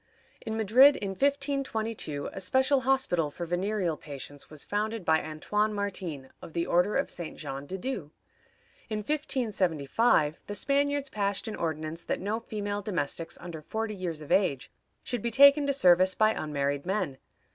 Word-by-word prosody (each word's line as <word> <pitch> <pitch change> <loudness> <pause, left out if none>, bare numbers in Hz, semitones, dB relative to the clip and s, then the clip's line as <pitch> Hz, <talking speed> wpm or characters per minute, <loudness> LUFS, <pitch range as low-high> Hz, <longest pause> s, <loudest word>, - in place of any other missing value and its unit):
In 220 0 -4
Madrid, 250 +7 +7
in 200 -1 -3
1522, 245 - -1
a 195 - -6
special 260 +7 +3
hospital 255 - +1
for 170 +4 -6
venereal 175 -1 -1
patients 145 -1 -9
was 155 -2 -5
founded 215 -1 -2
by 160 0 +4
Antoine 210 +7 -1
Martin, 180 -9 -4
of 160 - -10
the 170 0 0
order 180 +4 +2
of 275 - 0
St. 170 -3 -6
Jean 135 +1 -6
de 190 - -4
Dieu. 195 - -4 0.8
In 215 -1 -2
1575 205 - +1
the 205 - -4
Spaniards 280 +3 +1
passed 200 0 -1
an 220 - -4
ordinance 160 0 -3
that - - -2
no 210 +4 -2
female 205 -2 -4
domestics 165 -5 -3
under 170 -3 -7
forty 220 +6 -3
years 175 -5 -4
of 150 - -9
age 140 -9 +2 0.3
should 245 -3 -3
be 235 - -1
taken 280 +4 +7
to - - +3
service 185 -7 +5
by 215 0 +4
unmarried 140 -3 -2
men. 185 -8 -2
200 Hz, 160 wpm, -29 LUFS, 160-230 Hz, 0.8 s, Madrid